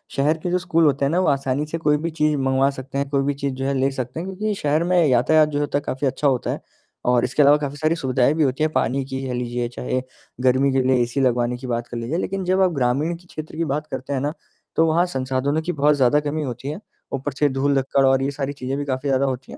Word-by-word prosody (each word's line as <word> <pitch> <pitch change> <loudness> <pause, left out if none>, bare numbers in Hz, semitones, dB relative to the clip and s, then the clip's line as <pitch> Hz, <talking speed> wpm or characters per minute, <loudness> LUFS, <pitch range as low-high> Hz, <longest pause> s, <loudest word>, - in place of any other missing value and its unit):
शहर 150 +3 +2
के 180 - -1
जो 180 - +3
स्कूल 165 -2 +2
होते 140 -1 +2
हैं - - +1
ना 175 - +2
वो 185 - +1
आसानी 140 +1 0
से 160 +2 -4
कोई 150 -2 +2
भी 165 +3 -3
चीज़ 150 -1 +1
मँगवा 135 0 +2
सकते 135 0 -6
हैं, 140 0 -1
कोई 140 -1 +1
भी 145 +1 0
चीज़ 140 -1 -3
जो 135 +1 -4
है 140 - 0
ले 135 +1 +2
सकते 130 +2 -5
हैं 180 - -5
क्योंकि 210 +3 -2
शहर 150 +3 +2
में 180 +1 +2
यातायात 150 +5 +4
जो 145 - -2
होता 145 -1 0
है - - -2
काफ़ी 135 +2 -1
अच्छा 140 +2 0
होता 130 -3 +1
है। - - -5 0.4
और 125 -1 +3
इसके 130 +4 +1
अलावा 145 +1 +6
काफ़ी 145 -1 -4
सारी 155 +2 +1
सुविधाएँ 130 -3 +1
भी 155 0 +1
होती 135 +2 0
हैं 155 - +1
पानी 135 +4 +1
की 135 0 -5
कह 130 - -3
लीजिए, 120 0 -2
चाहे 125 +1 -3 0.4
गर्मी 130 +2 +3
के 135 - +3
लिए 130 - +4
एसी 120 +3 -1
लगवाने 125 -1 +1
की 130 +1 -8
बात 120 -1 -2
कर 120 - -6
लीजिए, 120 +8 -2
लेकिन 190 +1 -2
जब 185 +1 +2
आप 185 -1 +4
ग्रामीण 140 +6 +1
क्षेत्र 155 -2 -8
की 165 - 0
बात 150 +1 -2
करते 130 +2 -4
हैं 135 - 0
ना, 145 +2 -1 0.4
तो 165 - +4
वहाँ 165 +3 +3
संसाधनों 135 -1 -1
की 170 +3 -2
बहुत 150 -1 +3
ज़्यादा 135 +1 +3
कमी 150 +1 -2
होती 125 0 -5
है, 155 - -5 0.3
ऊपर 135 +2 -2
से 145 - +4
धूल-धक्कड़ 135 0 +1
और 135 0 +4
ये 140 - 0
सारी 140 0 -3
चीज़ें 135 0 -4
भी 145 - -3
काफ़ी 135 +1 -2
ज़्यादा 135 0 +2
होती 130 -1 -4
हैं। - - -9
140 Hz, 275 wpm, -22 LUFS, 130-150 Hz, 0.4 s, अलावा